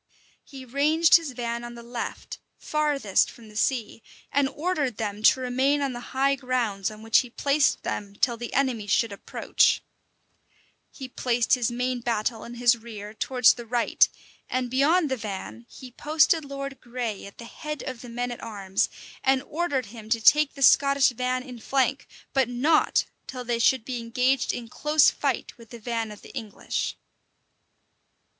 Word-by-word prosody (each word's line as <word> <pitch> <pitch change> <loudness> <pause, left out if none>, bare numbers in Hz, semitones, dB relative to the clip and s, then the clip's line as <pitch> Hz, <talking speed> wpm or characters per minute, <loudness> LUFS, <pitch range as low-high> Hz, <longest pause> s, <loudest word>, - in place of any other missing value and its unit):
He 265 -2 -11
ranged 305 +7 +5
his 320 -6 -6
van 235 -1 -3
on 240 0 -8
the 235 - -10
left, 235 0 -6 0.2
farthest 295 -9 +1
from 225 -2 -14
the 210 - -16
sea; 225 0 -1 0.3
and 280 -1 +2
ordered 295 - -2
them 210 -2 -4
to 240 - +5
remain 260 +3 +1
on 270 -2 -1
the 240 - -6 0.2
high 275 +1 +4
grounds 250 -7 -1
on 215 0 -11
which 225 0 +5
he 250 - -3
placed 280 +4 +1
them, 200 -1 -4
till 240 +3 +1
the 235 +1 -7
enemy 255 -6 0
should 225 +2 +2
approach: 200 - +1 1.1
he 265 - -9
placed 245 -2 0
his 250 -3 +2
main 250 +1 -2
battle 230 -1 -2
and 240 0 -9
his 240 0 +4
rear 215 -2 -9
towards 250 +1 +4
the 240 - -9
right; 240 0 +3 0.4
and 250 -1 -2
beyond 295 +4 +3
the 260 - 0
van 190 - -7
he 255 -1 -11
posted 310 +4 +2
Lord 275 -1 -6
Grey 235 -5 -4
at 200 - -14
the 235 - -9
head 300 +4 -6
of 255 -3 -6
the 245 - -10
men 245 +1 -3
at 240 - -7
arms, 195 -3 -1 0.3
and 265 0 +2
ordered 290 -5 -2
him 220 0 -11
to 230 0 +2
take 290 +6 +5
the 275 - -2
Scottish 275 +1 +5
van 255 +1 -2
in 250 -3 -10
flank, 270 +3 0 0.3
but 265 -3 +2
not 280 +6 +2 0.2
till 255 -1 -6
they 235 -1 -1
should 235 0 +3
be 250 -2 -3
engaged 250 +3 +1
in 235 -1 -6
close 300 +5 +3
fight 275 -4 -2
with 230 -1 -14
the 235 - -9
van 230 -1 -3
of 210 -1 -11
the - - -13
English. 225 -6 -4
245 Hz, 175 wpm, -26 LUFS, 230-275 Hz, 1.1 s, ranged